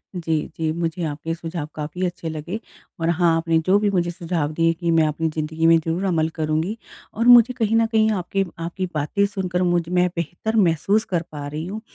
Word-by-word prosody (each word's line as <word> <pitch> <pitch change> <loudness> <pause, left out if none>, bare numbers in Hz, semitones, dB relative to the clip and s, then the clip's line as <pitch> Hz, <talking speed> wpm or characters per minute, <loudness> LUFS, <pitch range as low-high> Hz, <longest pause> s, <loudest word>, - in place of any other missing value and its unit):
जी, 165 -3 -1
जी। 160 -1 0
मुझे 170 +1 -2
आपके 155 +2 -3
सुझाव 165 -2 -5
काफ़ी 155 +4 -3
अच्छे 175 -2 -4
लगे 160 +7 -5 0.4
और 165 +1 0
हाँ, 170 -1 +3
आपने 165 0 +1
जो 190 +2 +5
भी 210 -1 +1
मुझे 175 -2 0
सुझाव 165 -3 -2
दिए 165 +1 +2
कि 170 0 -2
मैं 160 -1 +4
अपनी 160 +2 -1
ज़िंदगी 160 +1 -2
में 165 0 +7
ज़रूर 165 +3 -2
अमल 160 -4 +1
करूँगी। 160 +7 -1 0.4
और 230 - -1
मुझे 245 0 +8
कहीं 225 -1 +1
न 225 0 +4
कहीं 220 -1 +2
आपके 195 0 -1
आपकी 175 +3 -3
बातें 150 +7 +1
सुनकर 185 -3 -2
मुझे 175 -1 0
में 180 0 +3
मैं 180 - +2
बेहतर 175 +7 -3
महसूस 200 +3 +2
कर 175 -3 -1
पा 145 -1 -6
रही 150 +2 -5
हूँ 215 +3 -5
170 Hz, 210 wpm, -22 LUFS, 160-190 Hz, 0.4 s, मुझे